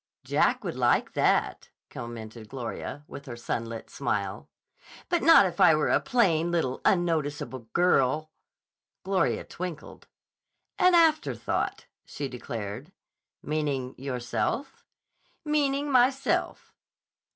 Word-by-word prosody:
"Jack - - +1
would - - -3
like - - +2
that," - - +1 0.2
commented 115 -2 -8
Gloria, 135 +3 -6
with 140 - -10
her 120 - -6
sunlit 115 -1 -5
smile. - - -3 0.6
"But 345 -2 +1
not 325 -11 +7
if 180 - -3
I 165 - +7
were 155 - +1
a - - +4
plain, 175 -9 +2
little, 160 -7 -1
unnoticeable 145 - 0
girl" 155 -3 +2 0.7
Gloria 190 -2 0
twinkled. 175 -4 -8 0.7
"An 365 0 +5
afterthought," 325 -1 +1 0.2
she 145 - -5
declared. 120 - -6 0.5
"Meaning 145 -4 -2
yourself?" 125 - -3 0.6
"Meaning 290 -1 +1
myself." 260 +2 +1
155 Hz, 105 wpm, -27 LUFS, 125-200 Hz, 0.7 s, not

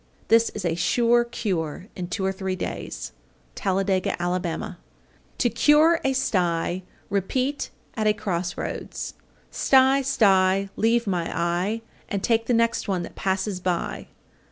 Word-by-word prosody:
This 230 0 +5
is 205 -3 -4
a 170 - +1
sure 235 +8 +3
cure 185 -8 -3
in 180 -1 -4
two 190 +2 -2
or 190 - +2
three 190 -1 -3
days. - - -5 0.4
Talladega, 190 -1 0
Ala. 175 +1 0
830. 175 +1 -4 0.6
To 240 - +2
cure 300 +8 +5
a 270 - +2
sty 180 -7 0 0.3
repeat 255 +8 -1 0.2
at 215 -1 0
a 210 - +5
cross 180 -4 -3
roads, - - -5 0.4
Sty, 265 +1 +4
sty, 195 -6 +3
leave 230 +2 +2
my 175 -4 -1
eye, 175 +7 -1 0.3
And 200 -1 -2
take 225 -1 +2
the 245 - +2
next 230 0 +1
one 185 -3 0
that - - -8
passes 190 0 -1
by. 180 -1 -2
195 Hz, 145 wpm, -25 LUFS, 180-230 Hz, 0.6 s, This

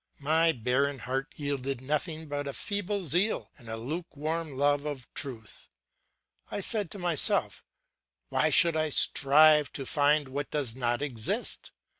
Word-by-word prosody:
My 160 +3 +3
barren 135 +2 0
heart 130 +3 -4
yielded 140 -3 -3
nothing 155 +4 -2
but 145 0 -4
a 140 - -4
feeble 205 -1 -3
zeal 180 +8 +1
and 115 - -9
a 110 - -3
lukewarm 155 +2 -4
love 145 +1 +2
of 145 -5 -6
truth. 115 -6 -6 0.8
I - - -4
said 205 -2 0
to - - -9
myself: 175 -5 0 0.7
Why - - +2
should 170 -1 +6
I 155 0 0
strive 150 +1 +5
to 135 - -4
find 145 0 +2
what 140 +2 -4
does 135 -6 -1
not 120 +1 0
exist? 120 -7 -2
145 Hz, 145 wpm, -28 LUFS, 135-160 Hz, 0.8 s, should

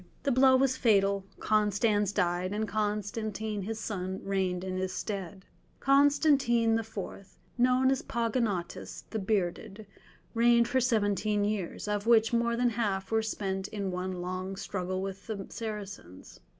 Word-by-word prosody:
The 280 - +1
blow 260 +1 +6
was 260 0 +2
fatal, 200 -4 +2
Constans 210 -1 +2
died, 180 -1 0
and 215 +1 -1
Constantine 210 0 -2
his 220 +3 -4
son 190 -3 -4
reigned 190 -2 -1
in 185 0 -3
his 185 0 -2
stead. 195 -2 -5 0.3
Constantine 275 -5 +4
IV., 200 -3 -7 0.2
known 255 +1 +3
as 270 - 0
Pogonatus, 230 -6 -2
"the 220 - -2
Bearded," 195 +1 -2 0.5
reigned 235 0 +4
for 260 +2 +1
seventeen 210 -3 +1
years, 205 -2 -2
of 210 +1 -2
which 225 -1 +5
more 235 0 +2
than 240 0 +2
half 205 -4 -2
were 225 0 +3
spent 195 -3 -3
in 200 -3 -3
one 180 +1 -3
long 185 +1 -4
struggle 185 -1 -3
with 195 0 -6
the 200 -4 -4
Saracens. 200 - -7
210 Hz, 140 wpm, -30 LUFS, 190-230 Hz, 0.5 s, blow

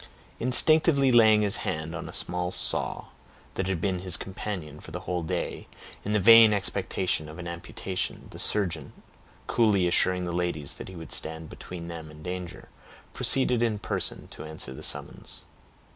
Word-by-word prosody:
Instinctively 140 +2 +5
laying 110 -3 +6
his 100 -1 +3
hand 80 +1 -3
on 85 - -6
a - - -7
small 90 0 -2
saw, - - -1 0.4
that 95 - -2
had 95 -3 -1
been 95 0 -1
his 90 -2 0
companion 90 -6 -6
for - - -12
the 90 +3 -6
whole 90 -1 -2
day, 80 - -4 0.4
in 105 - -2
the 105 - +3
vain 115 +2 +8
expectation 95 -5 -2
of 80 - -10
an 85 -1 -7
amputation, 90 +2 -5
the - - -10
surgeon, 100 -5 -1 0.5
coolly 105 -6 +2
assuring 90 +1 +2
the 85 - -3
ladies 85 -5 -2
that - - -9
he 95 - -10
would 80 -4 -9
stand 80 0 -1
between 85 -2 -8
them 80 -2 -7
and 75 0 -13
danger, 90 0 -6 0.5
proceeded 125 -3 +2
in 115 -3 +1
person 105 - -3
to - - -10
answer 80 -4 -5
the - - -10
summons. - - -3
90 Hz, 170 wpm, -27 LUFS, 80-105 Hz, 0.5 s, vain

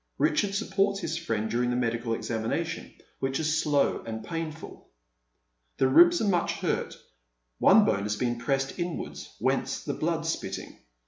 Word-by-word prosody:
Richard 200 -1 +1
supports 200 -1 +1
his 165 -4 -3
friend 115 -10 -2
during 120 +2 0
the 120 - 0
medical 115 -1 0
examination, 115 -1 -3 0.3
which 135 0 -1
is 155 0 +1
slow 145 -2 +2
and 110 -1 -6
painful. 165 -1 -6 0.9
The 130 - +3
ribs 175 +5 +7
are - - +1
much 180 -3 +1
hurt, - - -2 0.6
one 210 +2 +7
bone 100 - +1
has 105 +1 -1
been 120 0 -1
pressed 135 +1 -1
iDwarda, 175 -1 -4
»'hence - - 0
the - - -2
blood - - -1
spitting. - - -4
140 Hz, 150 wpm, -28 LUFS, 120-175 Hz, 0.9 s, ribs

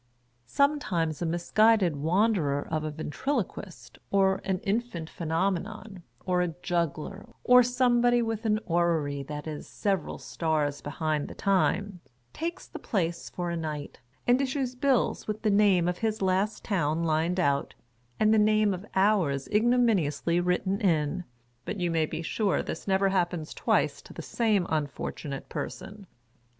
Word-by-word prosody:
Sometimes, 180 - 0
a 170 - 0
misguided 185 +2 +3
wanderer 160 -2 +1
of 155 -1 -1
a 155 - -2
Ventriloquist, 185 - -4
or 190 -1 +2
an 190 -1 0
Infant 200 -6 -2
Phenomenon, 190 +4 -2 0.2
or 180 -1 +1
a 170 -3 -2
Juggler, 175 +3 -2 0.2
or 250 0 +7
some 245 0 +2
body 240 0 +3
with 225 -1 -3
an 215 0 +2
Orrery 165 -5 +1
that 150 +2 -6
is 155 -2 -6
several 195 -5 -2
stars 150 -3 -1
behind 150 0 -2
the - - -9
time, 195 0 +1 0.3
takes 335 +2 -4
the - - -9
place 170 -6 -2
for 175 -1 -4
a - - -2
night, 155 -3 -5 0.3
and 245 +2 +4
issues 265 -1 -1
bills 260 -1 +1
with 215 +1 -4
the 215 - +3
name 200 -4 +4
of 180 0 -1
his 220 -1 -1
last 195 +3 0
town 165 -5 0
lined 165 +3 +1
out, 140 -5 0 0.4
and 215 0 +4
the 220 - +5
name 215 -1 +3
of 185 +1 -6
ours 190 -9 +2
ignomiuiously 210 - +2
written 185 +2 0
in, 165 -2 +1 0.4
but 205 - -5
you 175 -1 0
may 160 -1 +1
be 165 - -5
sure 200 +3 0
this - - -6
never 195 0 +3
happens 175 -4 -1
twice - - +1
to - - -14
the - - -7
same 215 -6 +1
unfortunate 145 -2 -3
person. 195 +1 -7
185 Hz, 150 wpm, -28 LUFS, 160-215 Hz, 0.4 s, or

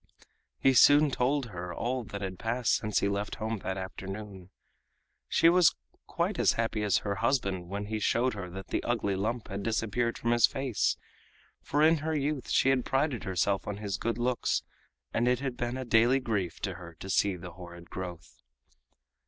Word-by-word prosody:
He 135 - +4
soon 145 +4 +6
told 130 0 0
her 90 -1 -6
all 125 +6 -2
that 100 0 -7
had 95 -2 -5
passed 115 +1 0
since 105 -1 +1
he - - +2
left 100 +1 -2
home 110 0 -3
that 95 0 -3
afternoon. 95 0 -7 0.8
She 165 - +4
was 175 -1 +5 0.3
quite - - -1
as - - +4
happy 115 -1 -1
as 105 -3 +3
her 100 0 -1
husband 100 -7 0
when 100 +1 -3
he 110 +1 -3
showed 120 +4 +1
her 95 -4 -6
that 95 +2 -8
the - - 0
ugly 110 -5 0
lump 110 +4 -2
had 100 0 -4
disappeared 115 +2 -1
from 115 - -1
his 120 -1 +6
face, 135 -5 0 0.6
for 145 +2 +1
in 160 +1 +6
her 155 +1 -2
youth 145 -1 -2
she 135 - +3
had 130 -2 +2
prided 135 -3 0
herself 95 +1 0
on 100 - -3
his 105 -1 -3
good 115 0 -1
looks, 120 -1 0 0.5
and 120 - +1
it 125 0 +3
had 135 -2 -3
been 120 +1 -3
a 130 - -4
daily 120 +3 +4
grief 105 -9 -2
to 95 - -2
her 85 -2 -10
to 85 - -9
see 95 +1 +2
the 90 0 -9
horrid 85 -1 -12
growth. 90 -2 -7
110 Hz, 190 wpm, -29 LUFS, 95-125 Hz, 0.8 s, soon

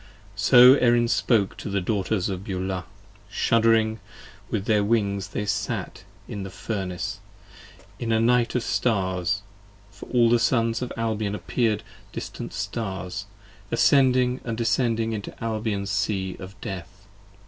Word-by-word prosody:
So 125 +5 +8
Erin 120 -1 +4
spoke 115 -3 +2
to - - -6
the 100 0 0
Daughters 95 0 -1
of 95 -1 -4
Beulah. 95 -2 -3 0.4
Shuddering 110 +1 +2 0.5
With 100 - -2
their 105 -2 +3
wings 100 -3 0
they 105 0 -4
sat 100 -1 -3 0.2
in 105 -5 -5
the 95 - -5
Furnace, 95 -2 -4 0.8
in 115 -1 -2
a 110 - +3
night 120 +1 +3
20 - - -1
Of 120 - -2
stars, 95 -6 0 0.5
for 100 - -12
all 120 -2 +4
the 120 - +5
Sons 115 0 +1
of 125 - -4
Albion 110 -2 -1
appear'd 110 -1 0 0.3
distant - - -6
stars, 100 -2 -4 0.4
Ascending 130 -1 +3
and 115 -2 -4
descending 115 0 +1
into 105 -2 -6
Albion's 110 -3 -2
sea 95 -2 -1
of 95 +2 -10
death. 95 +2 -7
110 Hz, 135 wpm, -25 LUFS, 100-115 Hz, 0.8 s, So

